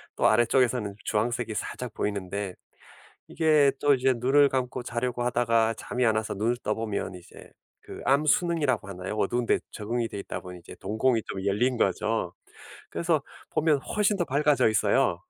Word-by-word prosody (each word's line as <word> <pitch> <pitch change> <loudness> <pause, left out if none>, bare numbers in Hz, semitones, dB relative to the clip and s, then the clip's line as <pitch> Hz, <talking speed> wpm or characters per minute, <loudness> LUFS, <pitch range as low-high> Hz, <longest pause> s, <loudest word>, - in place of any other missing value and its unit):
또 - - +3
아래쪽에서는 120 -2 +2
주황색이 115 +1 -1
살짝 125 -3 -5
보이는데 100 -1 -3 0.7
이게 155 -4 +3
또 145 -1 +4
이제 130 0 +2
눈을 140 +4 +4
감고 125 -1 -2
자려고 120 +1 -2
하다가 115 -2 +2
잠이 125 +3 -2
안 110 -1 +3
와서 110 -1 -2
눈을 115 +5 0
떠 105 - 0
보면 105 -4 -3
이제 90 -1 -13 0.3
그 - - -10
암순응이라고 145 - +2
하나요? 95 +2 -5
어두운데 120 +4 +1
적응이 115 +2 -2
돼 100 - -7
있다 - - -6
보니 90 -1 -10
이제 - - -12
동공이 110 +4 0
좀 95 -1 -5
열린 120 +6 +1
거죠. 105 -1 0 0.6
그래서 165 -4 0 0.3
보면 150 -3 +2
훨씬 210 +5 0
더 175 - 0
밝아져 145 -3 +3
있어요. 110 +5 +2
120 Hz, 355 characters per minute, -27 LUFS, 105-135 Hz, 0.7 s, 또